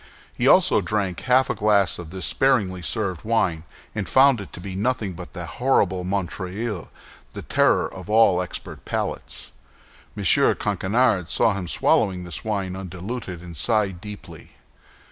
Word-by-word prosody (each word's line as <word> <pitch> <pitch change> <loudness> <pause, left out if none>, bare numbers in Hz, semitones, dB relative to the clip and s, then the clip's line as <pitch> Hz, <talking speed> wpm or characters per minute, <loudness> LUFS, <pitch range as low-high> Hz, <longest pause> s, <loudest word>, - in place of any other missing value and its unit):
He - - 0
also - - +5
drank 100 -5 -1
half 130 +1 +3
a - - 0
glass 100 -4 +2
of 85 -3 -8
this 95 +2 -4
sparingly 100 -9 +1
served 95 -4 -2
wine, 90 -8 0 0.3
and 105 - -3
found 130 -3 +5
it 100 - -10
to - - -8
be 95 +1 -7
nothing 105 -2 -1
but 90 0 -10
that 90 -2 -6 0.2
horrible 95 -8 +2
Montreuil—the 95 +2 -5
terror - - +2
of - - -11
all 105 -5 +5
expert 90 - -7
palates. - - -4 0.7
M. - - -4 0.3
Coquenard 100 -3 +1
saw 110 - +3
him 95 -3 -4
swallowing 95 0 +1
this 90 -4 -5
wine 100 -4 -2
undiluted, 95 0 -6
and 85 -1 -9
sighed 100 0 0
deeply. 105 -1 -11
95 Hz, 145 wpm, -23 LUFS, 90-110 Hz, 0.7 s, also